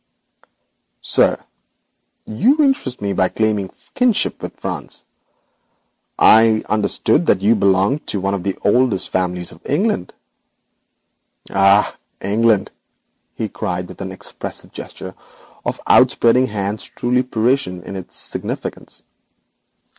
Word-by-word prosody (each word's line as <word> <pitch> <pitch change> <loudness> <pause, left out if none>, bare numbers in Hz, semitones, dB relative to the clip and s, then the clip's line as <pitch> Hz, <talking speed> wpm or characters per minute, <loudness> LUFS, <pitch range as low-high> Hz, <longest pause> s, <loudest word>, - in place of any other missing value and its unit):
'Sir, - - +3 0.9
you 225 - +2
interest 140 - 0
me 100 -1 -1
by 95 0 +2
claiming 105 -3 -1 0.2
kinship 250 -4 +1
with - - -8
France. - - -6 1.1
I 110 - +7
had 110 -1 +2
understood 105 -1 +1
that - - +3
you 110 +3 +5
belonged 100 +6 +1
to 100 - -1
one 95 +1 -1
of 100 - -2
the 95 +1 -3
oldest 115 -2 +2
families 90 -1 -2
of - - -15
England.' 150 - -1 1.4
'Ah, 100 +1 +4 0.2
England!' 105 0 +1 0.6
he 110 - -3
cried, 90 -3 -4
with - - -11
an 95 -1 -5
expressive 95 - -7
gesture 95 0 -9 0.5
of - - -3
outspreading 125 +2 +4
hands 105 -1 -3
truly 125 +1 0
Parisian 120 -6 0
in 95 - -8
its 95 -2 -8
significance. - - -4
105 Hz, 115 wpm, -19 LUFS, 95-120 Hz, 1.4 s, I